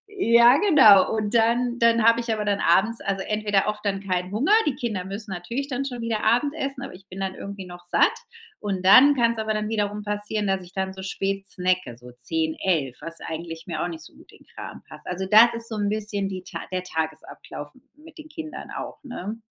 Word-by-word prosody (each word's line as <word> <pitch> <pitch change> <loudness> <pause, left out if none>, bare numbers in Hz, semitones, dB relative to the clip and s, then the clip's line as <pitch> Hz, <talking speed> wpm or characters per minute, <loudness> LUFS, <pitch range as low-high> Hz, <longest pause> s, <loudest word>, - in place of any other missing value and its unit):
ja 235 - +6
genau 265 - +6
und 215 0 -2
dann 240 +2 +2
dann 230 -1 +4
habe 230 +1 +5
ich 235 -1 -3
aber 215 -1 -3
dann 205 -1 0
abends, 215 +7 +2
also 195 -1 -2
entweder 210 -2 0
oft 210 0 -3
dann 195 -1 -1
keinen 185 -1 -2
Hunger 255 - 0 0.2
die 280 - 0
Kinder 215 -8 -3
müssen 200 +2 -7
natürlich 235 +10 -4
dann 275 +1 -2
schon 245 -3 -5
wieder 230 -2 -2
Abendessen, 275 +3 0
aber 275 - -8
ich 190 +1 -15
bin 190 - -9
dann 190 -1 -3
irgendwie 200 -1 -8
noch 175 0 -12
satt. 175 - +3 0.5
Und 195 -3 -3
dann 270 +9 +8
kann's 235 -3 +1
aber 220 0 -1
dann 215 0 -2
wiederum 210 -1 -2
passieren, 210 0 -2
dass 195 -1 0
ich 180 -1 -14
dann 190 0 -3
so 190 - -9
spät 195 0 -3
snacke, 180 - -1
so 125 0 -13
10:00, 160 +2 -1
11:00, 150 -9 0
was 165 0 -8
eigentlich 165 0 -6
mir - - -3
auch - - -1
nicht 160 -2 -8
so - - -14
gut - - -18
in - - -20
Kram - - -9
passt. - - -13
Also 180 +1 -3
das 225 +4 +7
ist 230 0 -6
so 225 - -4
'n 205 -1 0
bisschen 205 -2 -2
die 185 -1 -6
Ta - - -7
der 185 -1 -2
Tagesablauf 160 -3 -6
m 255 - -21 0.2
mit 315 +1 -16
den 310 0 -11
Kindern 310 +1 -8
auch, - - -6
ne? 225 -5 -6
205 Hz, 225 wpm, -24 LUFS, 185-230 Hz, 0.5 s, dann